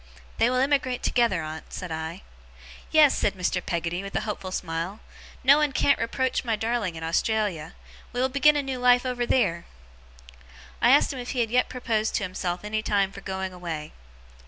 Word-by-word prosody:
'They 230 - +4
will 255 - 0
emigrate 265 -2 +1
together, 230 -9 +2
aunt,' 155 +1 -8
said 180 -3 -6
I. 160 +3 -5 0.7
'Yes!' 305 -3 +6
said 205 - 0
Mr. 180 -1 -1
Peggotty, 170 +1 -2
with 195 0 -8
a - - +1
hopeful 205 -3 -5
smile. 175 +3 -4 0.4
'No 275 +3 +7
one 300 -2 +2
can't 280 - +2
reproach 255 +3 -1
my 230 -3 0
darling 220 -5 -1
in 160 - -7
Australia. 175 -1 -1 0.4
We 245 - -4
will 260 - +3
begin 280 +3 +4
a 290 - 0
new 265 -2 -4
life 245 0 +4
over 245 -1 -1
theer!' 170 -9 +1 1.2
I 240 - +5
asked 280 +2 +5
him 260 - -6
if 245 - -6
he 245 -2 +2
yet 245 +3 +1
proposed 225 -4 -1
to - - 0
himself 180 -1 -3
any 215 +1 -2
time 200 -2 +1
for 195 - -10
going 190 -1 -4
away. 165 -4 -6
215 Hz, 185 wpm, -26 LUFS, 180-250 Hz, 1.2 s, No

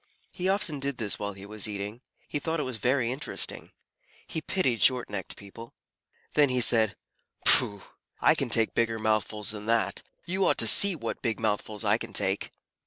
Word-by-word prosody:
He 185 +1 -2
often 185 -7 0
did 140 -1 -2
this 105 -3 -1
while 105 0 -3
he 95 0 -11
was 105 +1 -3
eating. 105 +3 -6 0.3
He 145 - -3
thought 160 +2 -2
it 130 -4 -3
very 125 +1 +1
interesting. 140 +4 -2 0.6
He 160 - -5
pitied 155 -11 -1
short 125 -4 +3
necked 95 -3 -5
people. 115 +4 -12 0.6
Then 145 -2 +4
he 125 0 +1
said, 115 -3 +5 0.5
"Pooh! 100 -2 +4 0.4
I - - +5
can - - -2
take 115 -1 +2
bigger 115 -1 0
mouthfuls 110 -1 0
than 105 0 -7
that. 110 -4 +1 0.2
You 190 +3 +1
ought - - +2
to - - +2
see 200 -2 +6
what - - -5
big 115 -2 -2
mouthfuls 110 0 -2
I 105 +2 +3
can 115 -3 -7
take." 95 +1 0
115 Hz, 180 wpm, -27 LUFS, 105-135 Hz, 0.6 s, see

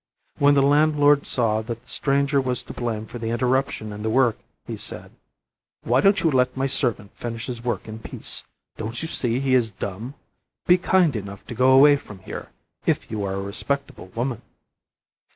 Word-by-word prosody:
When 145 0 +5
the 140 - +4
landlord 145 0 +4
saw 110 -3 +1
that 115 +1 -6
the - - -29
stranger 140 +1 +1
was 125 -2 -2
to - - -9
blame 115 -3 -3
for 120 - -8
the 115 0 -3
interruption 125 -2 0
in 105 - -7
the 110 - -1
work, 120 -1 +2 0.3
he - - -5
said: - - -5 0.7
"Why 125 +3 +3
don't 195 0 +4
you 165 - +2
let 125 -1 +1
my 135 - 0
servant 120 -6 0
finish 115 -1 -5
his 120 -2 -6
work 120 -1 -2
in 110 0 -7
peace? - - -3 0.3
Don't 115 +2 -4
you - - -2
see 120 -5 -1
he 135 -1 0
is 120 -3 +3
dumb? 105 +6 -6 0.5
Be 180 +1 +5
kind 175 -5 +3
enough 100 -2 -6
to - - -7
go 130 +3 +3
away 145 +2 +7
from 105 -7 -12
here, - - -7 0.4
if - - 0
you 105 -2 -2
are 95 -1 -2
a 95 - -3
respectable 140 +3 -1
woman." 120 0 -2
125 Hz, 190 wpm, -23 LUFS, 110-140 Hz, 0.7 s, away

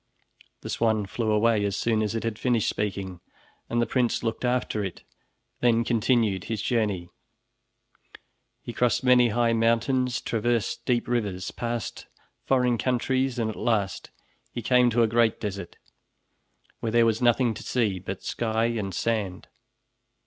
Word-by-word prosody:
'" - - -30
The - - -7
swan 110 -2 +1
flew 110 +3 -2
away 110 0 +3
as 100 -1 -1
soon 110 -2 +1
as 110 +1 -1
it 115 - -2
had 115 -2 -3
finished 120 -4 +1
speaking, 95 -3 -3 0.5
and 120 - 0
the 120 - +3
prince 125 -3 0
looked 115 +1 -2
after 125 -4 0
it, 95 -3 -6 0.6
then 115 -1 +3
continued 115 -4 +1
his 110 -1 -3
journey. 105 -8 -1 1.5
He 120 - -6
crossed 120 -1 +1
many 125 -1 +5
high 115 +1 +1
mountains, 120 +2 +1
traversed 115 -1 -1
deep 120 -2 +1
rivers, 105 -7 -2
passed 120 -1 -4 0.4
foreign 125 -3 +2
countries, 130 +1 0
and 115 -2 0
at - - -10
last 105 -6 -1 0.4
he 120 - -5
came 125 +1 +4
to 120 0 +3
a - - +3
great 115 0 +2
desert, 100 -4 -5 1.0
where 115 - -2
there 115 0 +4
was 115 0 +1
nothing 120 -1 +3
to - - -9
see 110 -7 0
but 95 +1 -6
sky 115 -1 -1
and 105 -6 -2
sand. 105 -6 -2
115 Hz, 155 wpm, -26 LUFS, 105-120 Hz, 1.5 s, many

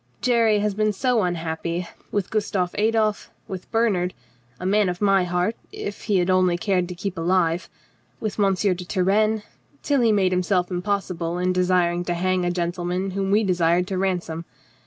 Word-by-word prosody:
"Jerry 230 -3 +3
has 205 0 0
been 215 +1 +1
so 245 +2 +1
unhappy. 170 -1 -2 0.2
With 205 -3 -2
Gustav 200 -4 -1
Adolf, 215 0 +1 0.2
with 185 -2 -7
Bernhard 200 -6 +1 0.2
— 120 0 -35
a 180 - -6
man 200 0 +3
of 180 0 -4
my 195 -3 +3
heart 180 +5 0 0.2
if 200 - -6
he 205 -3 +2
had 175 -1 +2
only 185 -2 +3
cared 185 -3 0
to 180 - -6
keep 185 0 -4
alive 170 0 +1 0.3
— 120 +1 -39
with 215 -1 -4
M. 195 -2 +3
de 190 +1 +1
Turenne 205 +4 +1 0.2
— 285 - -35
till 285 -3 +2
he 230 -2 +4
made 195 -3 +2
himself 180 0 +1
impossible 180 -2 -2
in 180 +1 +1
desiring 180 -1 +2
to 175 - -1
hang 185 +1 0
a - - +1
gen 175 -1 -1
tleman 180 +2 -3
whom 195 0 -2
we 210 +3 +3
desired 180 -2 +2
to 190 - -2
ransom. 175 -3 -2
185 Hz, 190 wpm, -23 LUFS, 175-205 Hz, 0.3 s, he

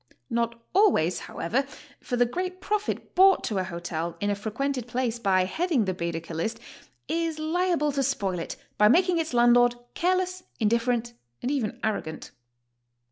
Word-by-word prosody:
Not 235 0 -1
always, 360 - +3
however, 235 +12 -1 0.4
for 245 - -3
the 245 - +5
great 365 +8 -4
profit 420 +2 -2
brought 385 +1 +6
to 205 -3 -1
a - - 0
hotel 170 -2 -4
in 205 +2 0
a - - 0
frequented 240 +5 -3
place 240 -1 -1
by 190 -4 +3
head 345 - -2
ing 245 -9 +3
the 190 - -1
Baedeker 170 -1 -4
list 170 +8 -2 0.5
is 330 -1 -1
liable 320 -1 +1
to 275 0 0
spoil 200 -9 -1
it 165 - -5 0.2
by 210 - +7
making 350 - +4
its 325 -1 -2
land 240 -1 +5
lord 245 0 +5 0.2
careless, 370 +1 0 0.2
indifferent, 235 +1 +1 0.3
and 250 - 0
even 255 -8 -2
arrogant. 200 -8 -3
240 Hz, 165 wpm, -26 LUFS, 205-325 Hz, 0.5 s, by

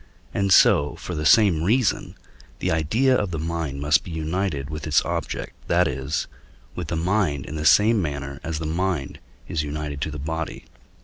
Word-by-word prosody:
and 100 -1 0
so 70 -4 +5
for 90 - -7
the 75 -2 0
same 100 -9 +5
reason 110 +7 +1 0.4
the - - -1
idea 110 - +2
of 105 -6 0
the 85 - -4
mind 80 -3 -3
must 75 +1 +3
be - - -9
united 80 -2 -2
with 75 +1 -6
its 75 - +3
object, - - -3
that - - +3
is, 65 +4 -2 0.5
with 90 -3 -5
the 85 - -2
mind 85 -4 0
in 75 - -7
the 75 0 -3
same 105 +6 +5
manner 70 -3 -4
as 80 -1 -3
the 80 - -4
mind 85 -3 -2 0.3
is 80 - -1
united 75 -1 -5
to - - -1
the 75 - -6
body. 80 +2 -4
80 Hz, 185 wpm, -23 LUFS, 75-90 Hz, 0.5 s, so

